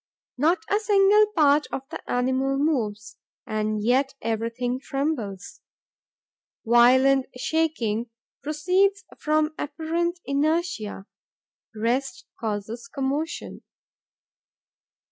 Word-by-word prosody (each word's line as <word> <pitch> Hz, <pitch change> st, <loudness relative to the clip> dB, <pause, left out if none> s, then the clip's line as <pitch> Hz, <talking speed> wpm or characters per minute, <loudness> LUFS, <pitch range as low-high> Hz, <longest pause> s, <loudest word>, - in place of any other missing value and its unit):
Not 325 Hz, +6 st, +2 dB
a 410 Hz, -, +2 dB
single 420 Hz, 0 st, +5 dB
part 295 Hz, -1 st, +4 dB
of 265 Hz, -, -4 dB
the -, -, -6 dB
animal 260 Hz, +2 st, +1 dB
moves; 220 Hz, -8 st, -1 dB, 0.3 s
and 215 Hz, -1 st, -2 dB
yet 265 Hz, +4 st, +2 dB
everything 230 Hz, +3 st, -2 dB
trembles. 270 Hz, -, -4 dB, 1.0 s
Violent 260 Hz, +3 st, +5 dB
shaking 250 Hz, -7 st, -1 dB, 0.3 s
proceeds 365 Hz, +7 st, +1 dB, 0.2 s
from 305 Hz, 0 st, +1 dB
apparent 335 Hz, +4 st, -2 dB
inertia. 290 Hz, -, -1 dB, 0.7 s
Rest 245 Hz, +3 st, -1 dB
causes 220 Hz, +3 st, -4 dB
commotion. 280 Hz, +3 st, -3 dB
275 Hz, 85 wpm, -25 LUFS, 230-315 Hz, 1.0 s, single